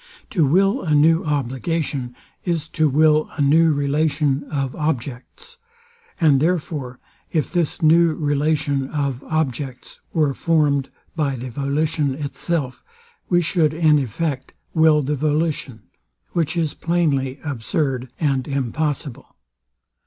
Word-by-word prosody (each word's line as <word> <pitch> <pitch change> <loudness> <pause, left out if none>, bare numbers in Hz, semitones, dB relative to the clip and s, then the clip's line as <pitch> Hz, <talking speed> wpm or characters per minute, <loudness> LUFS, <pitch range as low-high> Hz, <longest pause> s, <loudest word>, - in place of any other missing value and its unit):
To 165 -8 +2
will 195 +7 +3
a 155 -4 +1
new 160 +3 +4
obligation, 140 -2 -2 0.3
is 165 -3 -1
to 155 -1 +1
will 155 +2 +3
a - - -1
new 160 +3 +5
relation 145 0 0
of 135 -3 -3
objects; 150 - -4 0.6
and 150 -6 +4
therefore, 150 -6 -1 0.3
if 155 -4 -1
this 170 -2 -1
new 165 +1 +5
relation 145 -2 0
of 140 -4 -2
objects 135 -4 -3
were 150 -4 +1
form'd 145 -4 +1 0.3
by 145 -4 0
the 125 0 -6
volition 145 +2 -1
itself, 145 -1 -3 0.5
we 175 -1 +3
should 155 -3 +1
in 155 -2 +4
effect 135 +2 -3 0.2
will 160 -2 +4
the 145 +3 -1
volition; 150 -5 -1 0.5
which 170 0 -1
is 160 -3 0
plainly 150 -6 0
absurd 130 -1 -2
and 135 -5 0
impossible. 140 0 -3
150 Hz, 120 wpm, -21 LUFS, 135-160 Hz, 0.6 s, new